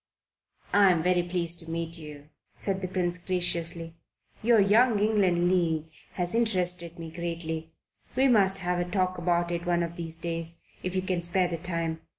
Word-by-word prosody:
"I'm 185 -5 +5
very 180 0 +3
pleased 175 -1 0
to 165 -2 -4
meet 165 0 -3
you," 150 -1 -11 0.3
said 195 -1 -1
the 185 - -2
Prince 180 -1 -1
graciously. 170 -2 -1 0.4
"Your 230 0 +4
Young 215 +3 +4
England 200 -5 +2
League 165 -3 0 0.2
has 175 -1 -2
interested 180 -7 +1
me 165 -1 -7
greatly. 165 -1 -4 0.4
We 265 +1 +4
must 195 -6 +4
have 180 0 0
a 175 0 -2
talk 185 -1 0
about 175 0 +1
it 170 0 -3
one 175 -1 +2
of 170 0 -5
these 165 -1 -4
days, 165 0 -3 0.2
if 185 0 -3
you 185 - 0
can 185 -2 -1
spare 175 +1 +1
the 170 - -3
time. 165 -2 -3
175 Hz, 170 wpm, -28 LUFS, 165-185 Hz, 0.4 s, I'm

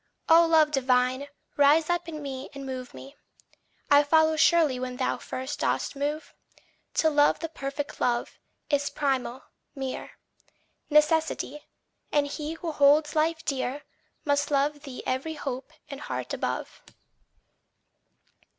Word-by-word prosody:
O 330 +1 +7
Love 315 -2 +4
divine, 255 0 +1 0.3
rise 295 +2 +5
up 350 -1 -1
in 305 -2 -6
me 270 -1 -6
and 275 -1 -7
move 255 -1 -6
me 275 +2 -12 0.8
I 285 0 +8
follow 315 +2 +3
surely 315 -4 +4
when 250 0 -4
thou 255 - -1
first 260 +3 -5
dost - - -1
move. 295 +3 -3 0.6
To 320 - +3
love 290 0 +4
the 330 - -3
perfect 285 0 -5
love, 240 -1 -1 0.3
is 285 0 +1
primal, 265 -3 -2 0.3
mere 265 -2 -5 0.8
Necessity; 300 -1 +1 0.4
and 290 -1 +3
he 300 +2 -4
who 325 0 -5
holds 295 +1 +4
life 320 +1 +1
dear, 275 +1 -2 0.4
Must 285 0 +1
love 290 +1 +1
thee 275 -3 -8
every 270 +5 -2
hope 270 -2 -5 0.2
and 280 -1 -8
heart - - -4
above. - - -4
290 Hz, 130 wpm, -27 LUFS, 270-310 Hz, 0.8 s, I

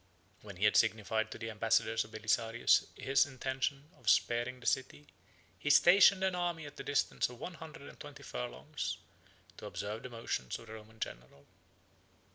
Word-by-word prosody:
When 100 -3 -10
he 95 +4 0
had 105 - +4
signified 110 0 +2
to - - -7
the 115 0 -5
ambassadors 110 +1 +1
of 105 - -14
Belisarius 115 +2 +2
his 135 +1 +3
intention 135 +3 -3
of 120 -5 -2
sparing 120 +4 +2
the 125 - -14
city, 140 +2 -1 0.5
he 145 - -2
stationed 190 +5 +7
an 190 -1 +2
army 175 -3 -2
at 145 - -11
the - - -6
distance 145 -3 0
of 125 -1 -12
one 180 - -6
hundred 160 -3 -10
and - - -13
twenty - - -10
furlongs, - - -4 0.6
to - - -8
observe 105 +2 -5
the 125 - -7
motions 115 - -3
of - - -13
the 110 - -10
Roman 110 0 -12
general. 65 - -7
120 Hz, 175 wpm, -33 LUFS, 110-145 Hz, 0.6 s, stationed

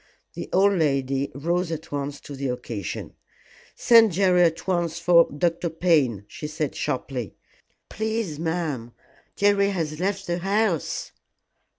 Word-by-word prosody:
The - - -7
old 200 +2 +4
lady 140 -5 0
rose 170 +4 -1
at 160 0 -6
once 145 0 -3
to 145 - -9
the 135 0 -3
occasion. 120 -7 -5 0.6
"Send 225 -4 +6
Jerry 180 -1 +3
at 165 -2 +2
once 175 -3 0
for 170 0 +5
Dr. 170 +3 0
Payne," 150 - +1
she 150 - -7
said 155 -1 -3
sharply. 125 -5 -3 0.5
"Please, 220 -7 -3
ma'am, 160 -8 -3 0.4
Jerry 200 0 +3
has 160 -5 -3
left 195 +1 -1
the 175 0 -2
house." 195 -2 0
165 Hz, 130 wpm, -24 LUFS, 140-185 Hz, 0.6 s, Send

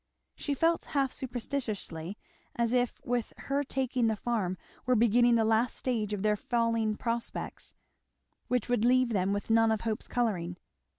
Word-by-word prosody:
She 285 - -2
felt 330 +4 +2
half 270 -2 +2
superstitiously 220 - -3 0.4
as 235 0 +1
if 245 -1 +1
with 240 -2 -1
her 280 +1 -1
taking 260 -3 0
the 220 - +1
farm 205 -5 -1 0.3
were 255 - +4
beginning 235 +1 +5
the 225 -1 +3
last 225 +2 +2
stage 225 -5 -1
of 205 -1 -2
their 210 0 +3
falling 230 -1 0
prospects, 230 +1 -4 0.7
which 250 -3 0
would 245 -3 +1
leave 255 +1 +4
them 195 -3 +1
with 205 +2 -2
none 225 0 +5
of 220 -1 0
hope's 220 -2 -2
colouring. 180 -8 -1
230 Hz, 160 wpm, -30 LUFS, 215-250 Hz, 0.7 s, beginning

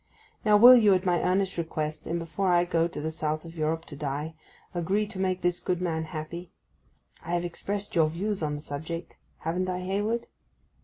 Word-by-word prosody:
Now, 210 -3 +6
will 245 +4 +10
you, 210 -5 +6
at 185 +1 -1
my 175 -2 +2
earnest 185 0 +1
request, 155 -2 -3
and 170 - -1
before 170 +3 -2
I 175 -1 +4
go 165 -1 +2
to 170 - -7
the 160 +1 -2
South 155 0 -2
of 165 0 -10
Europe 160 +1 -1
to 145 - -9
die, 145 +2 -3 0.4
agree 190 +5 0
to 200 -2 -9
make 185 -1 0
this 175 0 +1
good 180 -1 -1
man 160 -3 -1
happy? 165 +2 -6 0.7
I 170 +1 -1
have 175 0 -1
expressed 200 +4 -3
your 160 -2 +4
views 195 +5 -2
on 150 -1 -1
the 145 - -6
subject, 160 +4 -6 0.2
haven't 180 +3 -1
I, 180 0 -2
Hayward? 205 +5 -1
175 Hz, 200 wpm, -28 LUFS, 160-190 Hz, 0.7 s, will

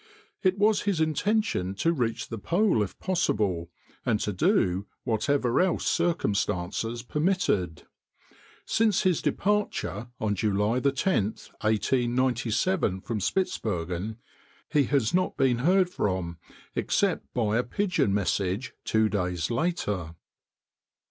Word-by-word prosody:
It 190 0 +2
was 210 0 +3
his 200 -5 0
intention 160 - 0
to 165 +11 +1
reach 120 -7 -2
the 115 - -5
pole 175 - +2
if 100 - -3
possible, 105 - 0 0.3
and 110 -3 +1
to 105 - -1
do 100 - +2 0.2
whatever 120 +2 +1
else 185 -2 +1
circumstances 115 - 0
permitted. 140 - 0 0.8
Since 220 -3 +2
his 185 -4 +2
departure, 155 - -1
on 105 -2 0
July 105 +3 +1
10, 140 - +2 0.4
1897, 120 - +1
from 110 +1 -3
Spitzbergen, 100 - -2 0.5
he 145 -2 +3
has 130 -4 +1
not 185 +1 +1
been 130 -4 +2
heard 180 +7 +4
from, 95 - -2 0.3
except - - 0
by 110 -3 +1
a - - +1
pigeon 180 - 0
message 100 +2 -1
two 110 0 +2
days 90 -2 -1
later. 105 - -1
115 Hz, 115 wpm, -27 LUFS, -, 0.8 s, heard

